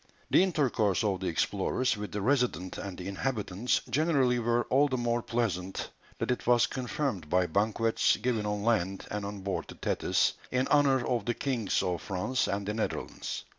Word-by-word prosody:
The - - +6
intercourse 130 - +1
of 100 -3 0
the 95 - -3
explorers 100 +8 0
with 105 0 -6
the 105 -1 -3
Resident 120 - 0
and 95 -2 -6
the 90 - -6
inhabitants 105 0 -1
generally 135 -5 +2
were 120 +1 +1
all 140 +3 +3
the 130 -2 -1
more 120 0 0
pleasant 100 -6 -2 0.3
that - - -1
it 125 - -3
was 120 -1 +5
confirmed 125 - -3
by 90 +2 +3
banquets 110 +4 +2
given 115 -4 -1
on 105 0 -2
land 95 -4 0
and 105 0 -3
on 100 0 -5
board 95 0 -2
the - - -10
Thetis - - +1 0.2
in 125 +1 +1
honour 135 -3 +4
of 120 -4 0
the 120 - 0
kings 120 -8 0
of 90 -2 -1
France 100 +7 -1
and 100 0 -2
the 105 - -1
Netherlands. 110 - -4
115 Hz, 180 wpm, -30 LUFS, 100-125 Hz, 0.3 s, The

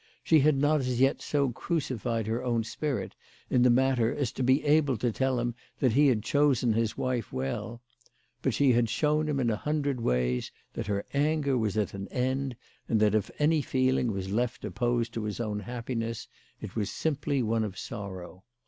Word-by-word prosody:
She 160 - +5
had 150 0 +4
not 145 +2 +3
as 125 -2 -1
yet 135 +1 +3
so 140 -3 0
crucified 120 - -2
her 115 +3 -2
own 120 -2 0
spirit 140 +5 -3 0.4
in 125 - +4
the 125 - +6
matter 125 -2 +3
as 135 -6 -1
to - - -6
be 130 +3 +3
able 145 -4 +3
to 120 +2 0
tell 130 +2 0
him 120 0 -1 0.2
that 130 - +2
he 145 +3 +5
had 115 -6 +2
chosen 135 -4 +2
his 115 0 0
wife 125 -4 -2
well; 90 - -4 0.6
but - - 0
she 140 -2 +4
had 120 -1 +2
shown 150 +6 +1
him 140 -2 0
in 120 -3 +2
a - - +1
hundred 140 0 -1
ways 60 - 0 0.2
that - - -4
her 100 -1 -1
anger 145 -1 +1
was 110 -4 0
at 105 - 0
an 100 0 -6
end, 130 +1 -1 0.3
and 110 - +3
that 105 -1 +3
if 110 -2 +1
any 155 +1 +3
feeling 130 -3 +1
was 95 -1 -4
left 120 +1 -1
opposed 120 +3 -1
to 115 - -3
his 105 +1 -4
own 105 -3 -2
happiness, 115 +1 -4 0.3
it - - -8
was 105 -3 -1
simply 145 -3 -1
one 115 0 +1
of 100 -3 -5
sorrow. 95 -3 -7
120 Hz, 195 wpm, -28 LUFS, 110-135 Hz, 0.6 s, the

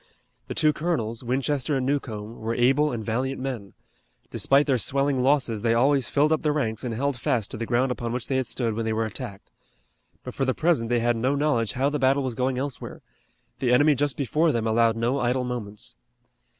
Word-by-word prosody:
The - - -5
two 155 -1 +3
colonels, 125 -9 -2
Winchester 135 +3 0
and 130 - -1
Newcomb, 115 -6 -3
were 115 +1 -2
able 135 +5 +3
and 110 -3 -4
valiant 130 +4 -2
men. 125 -7 -5 0.6
Despite 140 +2 +3
their 130 -4 +1
swelling 135 +1 +1
losses 130 -5 +2
they 115 0 +2
always 135 +1 +2
filled 150 +2 +2
up 160 - +2
the 150 - +1
ranks 115 -7 -2
and 120 -3 -3
held 140 +3 -1
fast 120 -5 -1
to - - -5
the 115 0 -4
ground 125 +2 +1
upon 120 -2 -3
which 125 -1 -2
they 135 - 0
had 130 -2 -1
stood 115 -3 -1
when 115 +2 -2
they 110 - 0
were 110 +1 0
attacked. 100 -2 -8 0.7
But - - -7
for - - -2
the 130 -1 0
present 155 -9 +1
they 120 -1 +2
had 120 0 +2
no 130 +5 +1
knowledge 140 -7 +1
how 135 +3 +1
the 150 - -1
battle 135 +1 +3
was 130 -2 -2
going 130 +2 -1
elsewhere. 135 0 -5 0.6
The 125 -2 +1
enemy 145 +5 +5
just 145 0 -1
before 155 +4 +1
them 115 -4 -1
allowed 115 0 +3
no 120 +4 0
idle 125 +1 0
moments. 120 -2 -6
125 Hz, 215 wpm, -25 LUFS, 115-140 Hz, 0.7 s, enemy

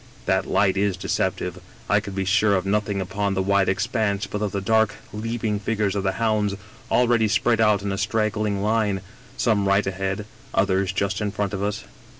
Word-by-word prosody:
That - - +1
light 95 -1 +2
is 100 -2 +1
deceptive; 90 -1 -2 0.3
I 105 - +4
could 100 -2 -7
be 95 -1 -1
sure 105 +1 +3
of 95 0 -1
nothing 100 0 0
upon 100 +1 -1
the 95 - +1
wide 100 0 +2
expanse 105 0 0
but 105 +2 -5
of 105 -2 -1
the 100 - -2
dark, 110 +1 +2 0.2
leaping 110 -1 -2
figures 105 -1 -1
of 100 - 0
the 95 -1 0
hounds 105 -1 0 0.3
already 120 -2 +3
spread 115 +2 +2
out 105 -3 +3
in 100 - -2
a 100 - -2
strag 110 +1 +1
g^ling 105 -1 -1
line, 105 -2 +1 0.4
some 105 -4 +2
right 100 +1 +3
ahead, 95 +1 -2 0.3
others 95 -1 +2
just 100 +2 -1
in 105 - 0
front 100 -1 -2
of 100 - -3
us. 105 +1 -2
100 Hz, 195 wpm, -23 LUFS, 95-105 Hz, 0.4 s, I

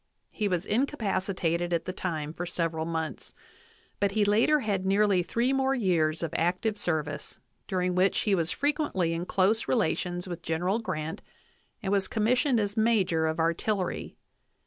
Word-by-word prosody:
He 210 - -1
was 180 -4 -1
incapacitated 195 - 0
at 170 - 0
the 185 - -3
time 155 -5 -3
for 175 +1 -5
several 165 -2 -1
months; 160 -4 -4 0.6
but 200 -1 +1
he 210 -1 +3
later 230 +9 +4
had 200 -5 -1
nearly 195 -1 +3
three 235 +8 0
more 270 0 +2
years 165 -9 +1
c\f 165 -3 -2
active 180 +6 0
service, 150 -3 -3 0.3
during 180 -1 0
which 185 +2 +2
he 210 - +1
was 170 -3 +1
frequently 285 - 0
in 170 +2 -3
close 205 +4 +2
re - - +2
lations 180 -5 -1
with 175 -1 -6
General 175 +6 0
Grant 160 -7 -4 0.6
and 190 - -1
was 195 -2 +2
commissioned 245 +3 +2
as 205 -1 -1
major 195 -8 +2
of 160 +1 -2
artillery. 175 +4 -1
185 Hz, 160 wpm, -28 LUFS, 165-215 Hz, 0.6 s, later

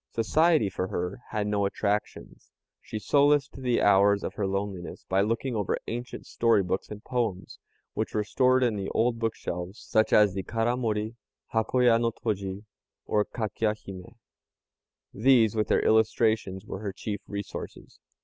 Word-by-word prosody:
Society 155 +3 +3
for 95 -1 -3
her 90 +3 -3
had 105 -2 -2
no 105 -1 0
attractions. 100 +1 -3 0.3
She - - -6
solaced 145 +4 +3
the 125 -2 +1
hours 100 0 +4
of - - -4
her 100 -2 -2
loneliness 100 -2 -4
by 95 +1 +2
looking 115 +4 -1
over 105 -4 0
ancient 120 +2 -6
story 115 -4 +2
books 95 +1 -3
and 105 0 -9
poems, 115 -7 -3 0.3
which - - -3
were 105 - +1
stored 130 +3 +3
in 115 -4 +1
the 95 -1 -3
old 115 +1 +1
bookshelves, 95 -4 -4
such 110 0 +1
as 105 -3 +5
the 95 - -2
Karamori, 115 0 -1 0.4
Hakoya 115 +1 +3
no 115 0 +2
toji, 100 -3 -4 0.4
or 105 - +2
Kakya 110 -1 -2
hime. 95 0 -11 1.0
These, 115 -2 +4
with 110 -1 0
their - - +2
illustrations, 110 -3 +2
were 95 - -6
her 100 -2 -4
chief 105 0 -5
resources. 100 -1 -7
110 Hz, 150 wpm, -27 LUFS, 100-115 Hz, 1.0 s, as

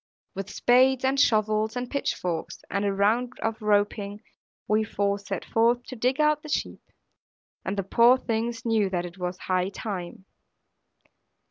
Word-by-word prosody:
With 195 +1 -5
spades, 260 +3 +3
and 270 +1 +2
shovels, 215 -2 +2
and 245 0 -3
pitch 280 +2 -1
forks, 170 -3 -4
and 200 +1 0
a 200 - +1
round 220 +6 +1
of 225 0 -2
roping, 205 0 0 0.4
we 215 +1 +2
four 200 -1 -1
set 195 -2 -5
forth 235 +2 +2
to 255 - -9
dig 255 +4 0
out 300 0 +3
the 305 - -10
sheep; - - -2 0.8
and 195 +2 -3
the 195 - 0
poor 235 +6 +5
things 230 -1 -3
knew 220 -4 +2
that 180 -2 -2
it 175 +2 -10
was 180 0 -3
high 185 0 -1
time. 190 -3 -6
215 Hz, 160 wpm, -26 LUFS, 195-245 Hz, 0.8 s, poor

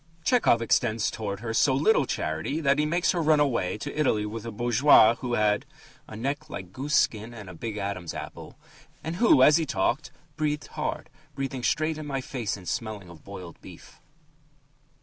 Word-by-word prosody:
Tchehov 225 - +3
extends 115 -1 +1
towards 105 -1 -5
her 115 -1 -3
so 130 +3 +3
little 150 - +3
charity 80 - -2
that 140 -2 +2
he 150 - +2
makes 170 +3 +1
her 175 - -1
run 155 -1 +4
away 115 -10 0
to 145 +7 -6
Italy 120 -8 +1
with 110 +2 -6
a - - -4
bourgeois 120 +1 +5
who 120 -2 -2
had 105 -1 +2 0.4
"a - - -9
neck 140 +7 -3
like 95 -6 -8
goose 145 +6 -2
skin 110 +2 +1
and 105 -4 -9
a 90 - -9
big 105 +5 -6
Adam's 100 -4 -4
apple," - - -8 0.5
and 160 +2 -4
who, 205 - +5
as 150 +3 +7
he 165 - 0
talked, 120 +7 -1 0.3
"breathed 150 -1 -2
hard, - - -4 0.2
breathing 135 -1 -4
straight 155 +6 0
in 155 - -7
my 135 -2 -2
face 125 -6 -4
and 90 -3 -13
smelling 105 -1 -4
of 80 -3 -14
boiled 90 -4 -10
beef." - - -14
120 Hz, 190 wpm, -26 LUFS, 105-150 Hz, 0.5 s, as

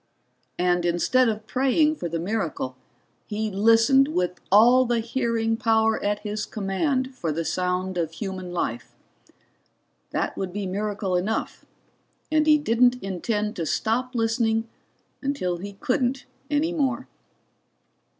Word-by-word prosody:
And 175 0 +2
instead 200 +9 +2
of 215 0 -4
praying 270 +6 +2
for 170 - -4
the 165 - -2
miracle, 170 -8 -3 0.5
he 215 0 -2
listened 230 +7 +5
with 180 - -2
all 240 +6 +7
the 240 -2 0
hearing 230 -1 -1
power 220 0 +2
at 205 0 0
his 210 0 -4
command 255 +7 -1
for 170 -11 -3
the 165 +2 -2
sound 180 +1 -1
of 165 -1 -2
human 185 0 -5
life. 120 -9 -3 1.1
That - - -2
would 190 -2 -4
be 205 +1 -4
miracle 200 0 -2
enough, 200 +5 -2 0.7
and 310 0 +3
he 305 -1 +7
didn't 245 -3 +3
intend 210 +3 -2
to 165 - -2
stop 250 - -1
listening 225 0 +1 0.5
until 270 -11 -1
he 200 +3 -7
couldn't 255 +3 -1 0.2
any 300 +3 +1
more. 270 -7 -1
220 Hz, 130 wpm, -25 LUFS, 185-250 Hz, 1.1 s, all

